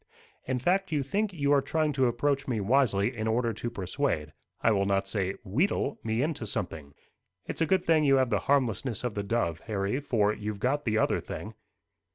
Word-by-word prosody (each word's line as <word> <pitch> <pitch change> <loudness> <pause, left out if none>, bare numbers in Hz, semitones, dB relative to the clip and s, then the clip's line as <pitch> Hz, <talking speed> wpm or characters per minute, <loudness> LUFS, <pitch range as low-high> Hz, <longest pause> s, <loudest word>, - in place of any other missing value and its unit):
"In 130 - 0
fact, 185 +9 +1
you 145 -3 +1
think 205 +9 -1
you 145 -5 0
are 140 - +5
trying 155 +2 0
to 130 -2 +3
approach 135 +3 0
me 120 -4 0
wisely, 115 0 +2
in 110 -1 -2
order 115 +1 +1
to 120 +3 -4
persuade, 90 - -2 0.3
I 115 - +3
will 100 -2 +2
not 95 0 +1
say 95 -2 -1
wheedle, 140 - 0
me 110 +3 0
into 145 -7 -2
something. 80 -9 -5 0.5
It's - - -5
a 165 - +3
good 190 -2 +2
thing 160 -2 +4
you 135 -2 +5
have 130 -2 +2
the - - +2
harmlessness 125 -4 +1
of 120 -3 -2
the 100 - -2
dove, 100 -6 -1
Harry, 105 +3 -1
for 110 -7 +1
you've 105 -1 -5
got 145 +6 0
the 110 -2 +1
other - - +2
thing." 110 - -7
120 Hz, 205 wpm, -28 LUFS, 105-140 Hz, 0.5 s, are